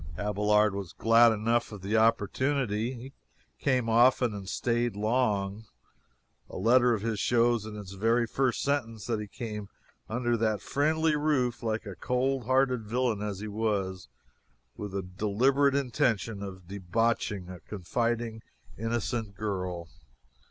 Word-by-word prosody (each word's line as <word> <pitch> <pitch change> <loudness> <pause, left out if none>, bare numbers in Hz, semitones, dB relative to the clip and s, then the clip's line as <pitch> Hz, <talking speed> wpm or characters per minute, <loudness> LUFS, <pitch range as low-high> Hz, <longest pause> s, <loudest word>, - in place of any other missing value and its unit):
Abelard 105 0 +2
was 100 -4 -5
glad 115 +1 +5
enough 115 +2 0
of 100 -3 -9
the 100 +3 -1
opportunity. 115 +1 +1
He 130 +2 -9 0.5
came 125 -4 +2
often 120 0 +4
and 100 -1 -7
staid 120 -2 0
long. 105 -2 0 0.8
A - - -7
letter 120 +4 +4
of 105 - -6
his 110 -2 -1
shows 120 -2 +2
in 110 - -7
its 100 -3 -8
very 115 +4 +2
first 130 +2 0
sentence 115 -6 -1
that 115 -3 -1
he 105 - -5
came 105 -2 -6 0.4
under 120 +1 0
that 110 -2 +1
friendly 155 +2 +1
roof 135 -5 0
like 110 -1 -2
a 100 - -6
cold 130 +1 -1
hearted 130 -2 +2
villain 115 -1 0
as 105 -2 -4
he 110 - -4
was, 100 - -2 0.7
with 105 -2 -6
the 100 -1 -2
deliberate 120 +10 +2
intention 115 -5 0
of 95 -3 -8
debauching 100 0 -1
a 90 -1 -8
confiding, 115 +4 -2 0.4
innocent 115 -2 -2
girl. 90 -4 -3
115 Hz, 140 wpm, -29 LUFS, 105-125 Hz, 0.8 s, glad